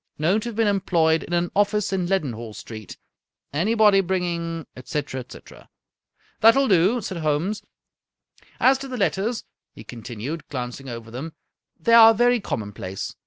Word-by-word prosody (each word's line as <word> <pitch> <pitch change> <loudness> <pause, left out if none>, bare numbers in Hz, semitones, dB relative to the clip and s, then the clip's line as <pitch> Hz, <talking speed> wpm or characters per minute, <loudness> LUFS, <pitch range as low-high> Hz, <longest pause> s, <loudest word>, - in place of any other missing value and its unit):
Known 180 +8 +2
to 240 - -4
have 230 - -8
been 225 0 +2
employed 170 -5 +2
in 175 - -7
an 175 0 0
office 205 0 +1
in 185 -2 0
Leadenhall 120 - -2
Street. 110 -3 -9 0.6
Anybody 205 +4 +4
bringing,'' 170 -3 -2
etc., 130 +1 -4
etc. 125 - -13 0.4
" - - -38
That 225 +1 +7
will 275 0 +3
do," 195 +5 +3
said 190 -3 -5
Holmes. 160 +7 -1 0.5
" - - -32
As 265 +1 +4
to 275 - -6
the 255 -1 -5
letters," 215 +3 0 0.3
he - - -11
continued, 120 +6 -7
glancing 130 0 -5
over 115 -1 -8
them, 145 +7 -6 0.5
"they 230 +8 +2
are 225 -1 +9
very 245 +2 +3
common 105 - -4
place. 95 -1 -6
175 Hz, 165 wpm, -23 LUFS, 135-210 Hz, 0.6 s, are